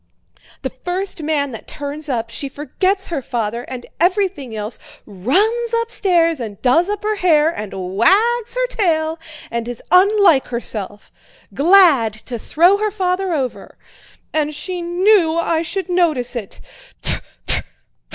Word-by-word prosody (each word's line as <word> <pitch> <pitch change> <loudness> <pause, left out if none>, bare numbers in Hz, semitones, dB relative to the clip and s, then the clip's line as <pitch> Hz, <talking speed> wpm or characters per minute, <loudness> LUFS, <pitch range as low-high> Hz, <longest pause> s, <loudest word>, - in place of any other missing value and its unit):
"The - - -2
first 365 0 -3
man 295 -3 -1
that 225 - -9
turns 290 +1 -6
up—she 235 +2 -3
forgets 375 +8 -1
her 320 -5 -2
father 235 -2 -3
and 250 -2 -7
everything 350 - 0
else, 215 +2 -4 0.3
runs 410 - 0
upstairs 350 - +1
and 215 -5 -6
does 325 +9 +3
up 415 0 -3
her 425 0 -1
hair 320 -4 +3
and 210 -11 -6 0.2
wags 435 - +3
her - - +1
tail 325 -9 0 0.3
and 235 0 -3
is 245 -1 -6
unlike 375 -5 +5
herself! 210 -4 -4 0.4
Glad 305 - +5
to 230 +2 -7
throw 350 - +3
her 425 +1 0
father 375 -2 -1
over! 270 -6 -4 0.6
And 305 -1 0
she 360 +3 -4
knew 350 -1 +3
I 335 -1 +1
should 370 +3 -3
notice 310 -9 +1
it. 215 -5 -6
325 Hz, 130 wpm, -19 LUFS, 250-380 Hz, 0.6 s, unlike